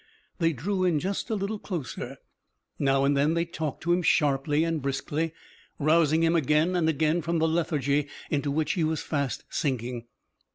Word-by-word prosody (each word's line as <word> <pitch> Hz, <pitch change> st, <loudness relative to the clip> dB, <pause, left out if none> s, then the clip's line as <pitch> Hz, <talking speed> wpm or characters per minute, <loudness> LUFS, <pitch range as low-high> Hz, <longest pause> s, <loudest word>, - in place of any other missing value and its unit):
They 165 Hz, -1 st, +3 dB
drew 185 Hz, -, -2 dB
in 175 Hz, -4 st, +2 dB
just 195 Hz, +8 st, -3 dB
a 220 Hz, -, 0 dB
little 200 Hz, +1 st, -3 dB
closer. 170 Hz, -, -5 dB, 0.6 s
Now 135 Hz, 0 st, +3 dB
and 140 Hz, +1 st, +3 dB
then 145 Hz, +4 st, +2 dB
they 170 Hz, 0 st, +1 dB
talked 160 Hz, -4 st, -5 dB
to 175 Hz, +2 st, +2 dB
him 180 Hz, -, +2 dB
sharply 150 Hz, -2 st, +2 dB
and 165 Hz, -2 st, -1 dB
briskly, 145 Hz, +4 st, -2 dB, 0.5 s
rousing 160 Hz, +1 st, +3 dB
him 165 Hz, +1 st, +3 dB
again 155 Hz, +3 st, +2 dB
and 165 Hz, -2 st, +2 dB
again 160 Hz, +2 st, +1 dB
from 170 Hz, +1 st, -1 dB
the 160 Hz, 0 st, +2 dB
lethargy 150 Hz, -3 st, +1 dB, 0.2 s
into 145 Hz, -1 st, 0 dB
which 150 Hz, +1 st, 0 dB
he 175 Hz, -, 0 dB
was 155 Hz, 0 st, -1 dB
fast 140 Hz, -4 st, -2 dB
sinking. 125 Hz, -5 st, -2 dB
155 Hz, 175 wpm, -27 LUFS, 140-170 Hz, 0.6 s, They